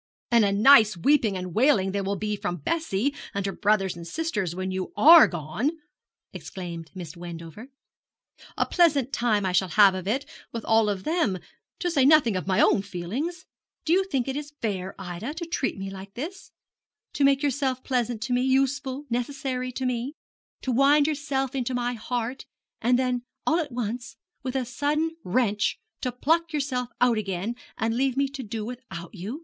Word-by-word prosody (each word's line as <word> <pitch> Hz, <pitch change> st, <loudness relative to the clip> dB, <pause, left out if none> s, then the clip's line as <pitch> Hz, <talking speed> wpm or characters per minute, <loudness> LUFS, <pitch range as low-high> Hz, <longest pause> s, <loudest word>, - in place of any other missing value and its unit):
'And 235 Hz, -2 st, +5 dB
a 200 Hz, -, +2 dB
nice 215 Hz, -1 st, +6 dB
weeping 220 Hz, -, +3 dB
and 180 Hz, -1 st, -5 dB
wailing 220 Hz, -, +3 dB
there 200 Hz, 0 st, -1 dB
will 200 Hz, +1 st, -1 dB
be 210 Hz, +2 st, -2 dB
from 175 Hz, -3 st, -3 dB
Bessie 285 Hz, -6 st, 0 dB, 0.2 s
and 200 Hz, -1 st, -1 dB
her 195 Hz, -, -1 dB
brothers 200 Hz, -3 st, +1 dB
and 170 Hz, 0 st, -9 dB
sisters 210 Hz, -, -2 dB
when 185 Hz, +1 st, -3 dB
you 185 Hz, 0 st, -3 dB
are 330 Hz, +2 st, +9 dB
gone!' 175 Hz, -, -2 dB, 0.6 s
exclaimed 170 Hz, -4 st, -7 dB
Miss 175 Hz, -3 st, -7 dB
Wendover; 170 Hz, +5 st, -9 dB, 0.9 s
'a -, -, +2 dB
pleasant 290 Hz, -7 st, +2 dB
time 215 Hz, -4 st, +1 dB
I 185 Hz, -, +1 dB
shall 185 Hz, +1 st, +2 dB
have 200 Hz, +1 st, +6 dB
of 185 Hz, 0 st, -5 dB
it, 260 Hz, +7 st, 0 dB, 0.3 s
with 230 Hz, -1 st, -5 dB
all 225 Hz, -1 st, +4 dB
of 195 Hz, -2 st, -3 dB
them 315 Hz, -, +1 dB, 0.4 s
to 355 Hz, -, -1 dB
say 285 Hz, -5 st, +3 dB
nothing 275 Hz, -7 st, +5 dB
of 185 Hz, -, -3 dB
my 190 Hz, -1 st, +2 dB
own -, -, +4 dB
feelings. 225 Hz, -, -4 dB, 0.4 s
Do 320 Hz, -, +3 dB
you 385 Hz, +2 st, +4 dB
think 270 Hz, -9 st, -1 dB
it 270 Hz, -, -2 dB
is 295 Hz, 0 st, -6 dB
fair, 195 Hz, -3 st, -3 dB
Ida, 190 Hz, -, -6 dB
to 340 Hz, +1 st, -4 dB
treat 330 Hz, -, -2 dB
me 195 Hz, 0 st, -5 dB
like 195 Hz, 0 st, -10 dB
this; 345 Hz, +10 st, -6 dB, 0.6 s
to 285 Hz, -, 0 dB
make 275 Hz, +1 st, +4 dB
yourself 265 Hz, -2 st, 0 dB
pleasant 240 Hz, -4 st, -1 dB
to 245 Hz, -, -2 dB
me, 245 Hz, -, +2 dB
useful, 270 Hz, +1 st, 0 dB
necessary 255 Hz, +1 st, -2 dB
to 260 Hz, -, -3 dB
me 250 Hz, +3 st, -2 dB, 0.5 s
to 260 Hz, -, -1 dB
wind 280 Hz, +4 st, +5 dB
yourself 285 Hz, -3 st, -1 dB
into 255 Hz, -1 st, -2 dB
my 245 Hz, 0 st, -1 dB
heart 245 Hz, +2 st, -4 dB, 0.3 s
and 245 Hz, +2 st, +3 dB
then 250 Hz, -1 st, 0 dB, 0.2 s
all 320 Hz, +2 st, +3 dB
at 300 Hz, -5 st, -3 dB
once, 240 Hz, 0 st, -4 dB, 0.2 s
with 260 Hz, -1 st, -4 dB
a 260 Hz, -2 st, 0 dB
sudden 295 Hz, +6 st, 0 dB
wrench, 210 Hz, 0 st, +1 dB, 0.2 s
to 250 Hz, -, -1 dB
pluck 330 Hz, +7 st, +1 dB
yourself 265 Hz, -4 st, -1 dB
out 240 Hz, -3 st, +3 dB
again, 195 Hz, +2 st, -3 dB, 0.2 s
and 225 Hz, +1 st, 0 dB
leave 265 Hz, +1 st, 0 dB
me 275 Hz, 0 st, +2 dB
to 275 Hz, 0 st, -7 dB
do 220 Hz, -2 st, -5 dB
without 225 Hz, -9 st, -8 dB
you? 210 Hz, -, -6 dB
245 Hz, 185 wpm, -26 LUFS, 195-275 Hz, 0.9 s, are